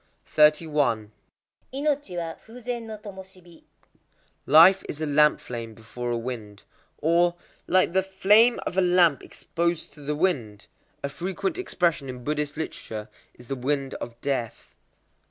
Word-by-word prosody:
31.—Inochi 155 - 0
wa 165 -1 -3
fū 225 +8 -14
zen 240 -1 -4
no 215 -1 -6
tomoshibi. 190 -4 -12 0.8
Life 165 +6 +7
is 150 - -5
a 160 - -1
lamp 150 0 +4
flame 115 -2 -7
before 120 +2 -6
a 120 - 0
wind. 115 -4 -6 0.3
Or, 170 +2 +2 0.3
"like 185 -2 +3
the 190 - +4
flame 200 +5 +4
of 190 - -1
a - - +5
lamp 175 -6 +4
exposed 170 -3 -3
to 150 - -14
the 150 +1 -2
wind." 125 - -1 0.4
A - - 0
frequent 190 - -3
expression 170 - 0
in 125 -1 -7
Buddhist 150 +1 -2
literature 110 -8 -5 0.3
is 125 - -15
"the 135 - -3
Wind 135 +1 -2
of 120 0 -7
Death." 130 -5 -3
155 Hz, 140 wpm, -25 LUFS, 130-190 Hz, 0.8 s, Life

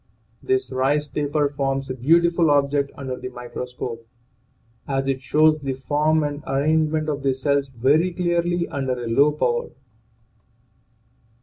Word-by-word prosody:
This 130 0 0
"rice 135 +3 +1
paper" 145 +1 0
forms 135 -1 -2
a 130 - -3
beautiful 170 +5 +3
object 140 -1 +2
under 130 -2 -5
the 125 0 -6
microscope, 125 -1 -7 0.8
as 135 -1 -1
it 135 -1 -1
shows 155 +2 +3
the 135 -2 -3
form 150 +4 +1
and 145 0 -4
arrangement 155 +3 +1
of 145 -2 -2
the 135 -1 +1
cells 140 +1 0
very 140 +8 +2
clearly 175 0 0
under 135 -2 -2
a 125 -1 -5
low 140 +6 +4
power. 120 -5 -1
140 Hz, 135 wpm, -22 LUFS, 130-155 Hz, 0.8 s, low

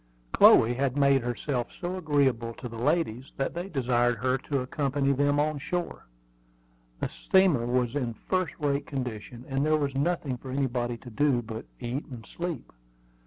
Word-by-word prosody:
Chloe 115 +2 +7
had 135 +1 -1
made 140 -1 +4
herself 120 +1 -2
so 180 +1 -3
agreeable 135 -9 +1
to 125 - -7
the 115 - -9
ladies 135 -4 0
that 135 - -1
they 175 +3 -5
desired 120 - +1
her 130 +4 +1
to 140 0 -2
accompany 140 +1 0
them 145 +1 +2
on 150 0 0
shore. 175 - -4 0.9
The - - -1
steamer 180 -11 +2
was 125 -1 +1
in 120 -5 -2
first 185 +2 -2
rate 145 -1 -1
condition, 125 -2 -5
and 135 0 0
there 155 +1 +3
was 140 -2 -1
nothing 140 -2 -1
for 130 - -10
anybody 125 -3 -1
to 125 +1 -12
do 135 -1 +2
but 110 0 -7
eat 125 +3 -4
and 120 -5 -9
sleep. 170 -7 -5
135 Hz, 165 wpm, -28 LUFS, 120-145 Hz, 0.9 s, Chloe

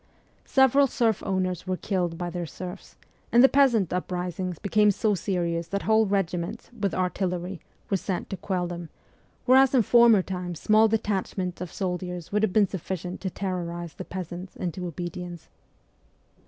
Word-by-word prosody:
Several 270 +1 +5
serf 230 -5 +1
owners 185 -2 -1
were 185 0 -1
killed 175 -4 -1
by 175 0 -4
their 175 -1 -4
serfs, 180 +6 -9 0.4
and 240 +2 +6
the - - +10
peasant 250 - +3
uprisings 180 -1 -3
became 210 +2 +3
so 210 +1 +1
serious 170 -3 -1
that 200 0 -3
whole 220 0 +3
regiments, 195 +2 -2
with 200 -4 -1
artillery, 180 -1 -2 0.3
were 195 - +1
sent 185 -1 -3
to 195 - -3
quell 180 0 -2
them, 175 -1 -6 0.6
whereas 265 +1 +6
in 245 - +5
former 235 -3 +6
times 180 -3 -5
small 215 +1 +5
detachments 195 -4 -2
of 180 -2 -5
soldiers 180 -2 -4
would 210 +1 +1
have 220 - +2
been 205 0 +4
sufficient 185 -1 -5
to 190 - -2
terrorize 175 -3 -4
the - - -7
peasants 180 0 -7
into 180 0 -4
obedience. 175 0 -6
185 Hz, 155 wpm, -26 LUFS, 175-210 Hz, 0.6 s, the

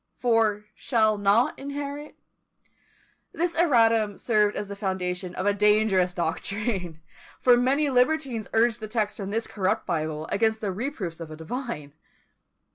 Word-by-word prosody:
for 225 -4 +1
shall 220 -4 +1
not 205 +4 +2
inherit. 285 +1 -6 1.2
This 340 0 -1
erratum 225 - +3
served 210 -3 +2
as 205 - -4
the 200 - -7
foundation 180 -2 -3
of 185 - -3
a 205 - +3
dangerous 210 -3 +3
doctrine; 180 0 -2 0.4
for 250 -1 +6
many 265 +5 +2
libertines 255 -3 +1
urged 230 0 +2
the 215 - -6
text 215 -1 -1
from 195 -2 -5
this 225 +2 -1
corrupt 190 -2 -1
Bible 155 -2 -2
against 220 +1 +1
the 205 -3 -2
reproofs 195 - -4
of 165 -2 -7
a 155 - -8
divine. 160 - -6
215 Hz, 140 wpm, -26 LUFS, 190-245 Hz, 1.2 s, for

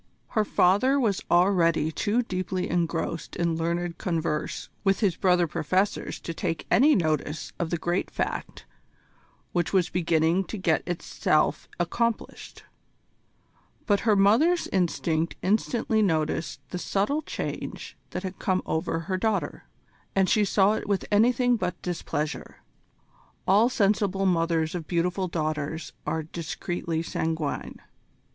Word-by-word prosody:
Her 215 - +2
father 210 +8 +3
was 215 -7 +1
already 170 -4 +3
too 220 +8 0
deeply 185 -3 -2
engrossed 165 -1 -2
in 170 -1 0
learned 170 +1 -2
converse 165 -5 -2 0.2
with 195 -1 +2
his 195 -6 +2
brother 180 -2 +3
professors 185 +6 -1
to 165 - -5
take 165 -1 -3
any 290 +5 +6
notice 155 -3 -1
of 170 - -1
the 170 - 0
great 175 +3 -1
fact - - -4 0.9
which 175 0 -1
was 185 -3 +2
beginning 170 +1 +2
to 215 - -6
get 175 -4 +1
itself 175 -1 0
accomplished; 235 -2 -2 1.2
but 205 -2 +3
her 220 -2 +3
mother's 235 - +4
instinct 170 -3 0
instantly 220 +2 +1
noticed 160 -5 0
the 180 - -3
subtle 205 - 0
change - - -5
that 180 - -5
had 190 0 -6
come 185 -1 0
over 165 +1 -1
her 185 +3 -2
daughter, 220 +1 -1 0.5
and 190 -1 +3
she 215 - +4
saw 200 +1 +3
it 220 - -3
with 200 -2 0
anything 245 +3 +4
but 180 -4 -3
displeasure. 160 -4 -4 0.8
All 210 +6 +5
sensible 200 -4 +1
mothers 165 -3 +1
of 170 -4 -5
beautiful 180 +2 0
daughters 155 -1 -3
are 160 -1 -1
discreetly 165 +1 -4
sanguine. 160 -2 -3
180 Hz, 130 wpm, -26 LUFS, 165-200 Hz, 1.2 s, any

